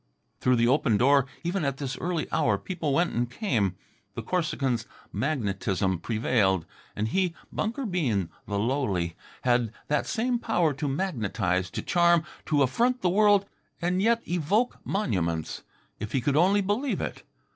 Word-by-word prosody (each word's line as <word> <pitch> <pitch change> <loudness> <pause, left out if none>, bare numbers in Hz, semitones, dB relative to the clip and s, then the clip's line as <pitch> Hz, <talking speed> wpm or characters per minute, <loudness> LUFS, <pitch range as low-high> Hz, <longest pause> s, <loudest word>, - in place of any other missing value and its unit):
Through 125 0 +3
the 120 0 +3
open 125 -4 +3
door, 140 +3 +4 0.2
even 175 +1 -1
at 140 -2 -1
this 135 -2 -3
early 175 -2 -1
hour, - - +2
people 165 -6 -3
went 170 +5 +2
and 120 0 0
came. 120 - 0 0.4
The - - -4
Corsican's 135 -10 -1 0.3
magnetism 100 - -1
prevailed. 105 -5 +1 0.3
And 105 +1 -1
he, 180 +3 0 0.2
Bunker 235 +5 -2
Bean, 125 - 0 0.2
the 100 - -2
lowly, 100 -8 0 0.3
had 120 -3 +2 0.2
that 150 - +1
same 240 +1 0
power 175 -10 +1
to 145 +2 -3
magnetize, 110 - -1
to - - -5
charm, 170 -1 +4 0.2
to 145 -2 +3
affront 240 - +1
the 180 - +4
world 205 0 +4 0.3
and 180 +2 0
yet 230 +2 +2
evoke 180 +8 +1
monuments 85 - -1 0.4
if 105 +1 -5
he 135 - +3
could 140 +3 +1
only 190 +6 +4
believe 215 +8 0
it. - - -4
140 Hz, 155 wpm, -27 LUFS, 110-185 Hz, 0.4 s, door